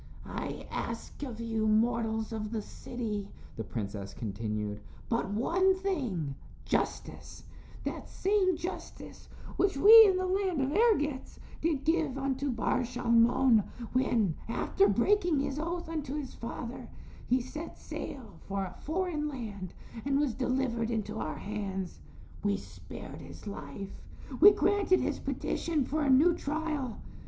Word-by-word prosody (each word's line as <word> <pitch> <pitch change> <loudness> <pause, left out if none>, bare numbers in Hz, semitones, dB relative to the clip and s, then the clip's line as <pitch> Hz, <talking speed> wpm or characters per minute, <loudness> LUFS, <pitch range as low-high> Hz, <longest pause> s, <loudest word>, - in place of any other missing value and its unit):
"I - - -5
ask - - -5
of 250 -6 -5
you 225 -1 0
mortals 225 0 +1
of 215 -1 -3
the 220 -2 -2
city," 210 -5 -5 0.3
the 110 - -4
princess 100 -3 -5
continued, 105 -1 -3 0.3
"but 230 -4 0
one 360 - +3
thing, 255 - -2 0.3
justice - - -2 0.4
that - - -5
same 380 -3 +2
justice 355 - -7 0.3
which 390 -7 +2
we 445 +6 +10
in 380 -2 +3
the 370 - 0
land 370 -3 0
of 270 +1 +1
Ergetz 300 - +2 0.2
did 310 -4 +1
give 315 -4 +1
unto 275 +1 -1
Bar 235 -1 +1
Shalmon 240 -1 +4 0.3
when, 235 -8 +2 0.2
after 200 -3 +2
breaking 335 - +3
his 275 +1 -2
oath 340 +2 -3
unto 300 -4 -3
his 290 -4 -4
father, 235 +1 -6 0.4
he 255 - +3
set 300 +6 -7
sail 255 -5 -7
for 195 0 -1
a 180 - -8
foreign 320 -2 -1
land 210 - -6 0.3
and 275 0 +2
was 290 -5 +1
delivered 250 -2 0
into 220 -1 -2
our 155 - -3
hands. 195 -3 -4 0.4
We 200 -1 +2
spared - - -10
his - - -11
life; 200 -1 -7 0.4
we 395 - +11
granted 400 -3 +3
his - - -1
petition 315 -5 -1
for 310 +4 -1
a 285 - +2
new 295 +7 +6
trial. 300 -6 -2
255 Hz, 140 wpm, -31 LUFS, 215-315 Hz, 0.4 s, we